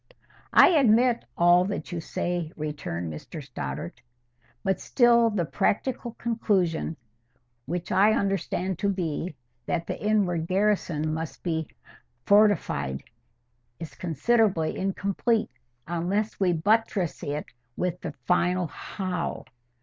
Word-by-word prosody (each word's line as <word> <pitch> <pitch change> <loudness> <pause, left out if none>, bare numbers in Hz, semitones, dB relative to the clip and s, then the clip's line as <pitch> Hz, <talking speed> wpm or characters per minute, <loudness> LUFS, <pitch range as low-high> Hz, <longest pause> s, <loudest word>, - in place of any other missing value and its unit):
"I - - +9
admit 245 - +4
all 175 +1 +6
that 200 0 -4
you 175 - -3
say," 175 -1 -3
returned 145 - -4
Mr 115 - -8
Stoddart. 85 - -6 0.6
"But 190 -2 0
still 235 -2 +4
the 195 -6 -1
practical 235 - -1
conclusion—which 155 - -3
I 200 +3 +5
understand 190 -3 -1
to 200 - +1
be, 175 -3 -2 0.3
that 170 -1 -1
the - - -5
inward 190 -6 +1
garrison 185 -6 +1
must 160 0 -5
be 160 -3 -1 0.6
fortified—is 120 - -1
considerably 180 - +1
incomplete 200 +4 0 0.4
unless 180 +6 -1
we 190 -3 +3
buttress 195 +1 +1
it 145 +1 -3 0.3
with 180 -1 -2
the 160 - -5
final 180 +2 +2
HOW. 180 +2 -4
175 Hz, 105 wpm, -26 LUFS, 155-205 Hz, 0.6 s, I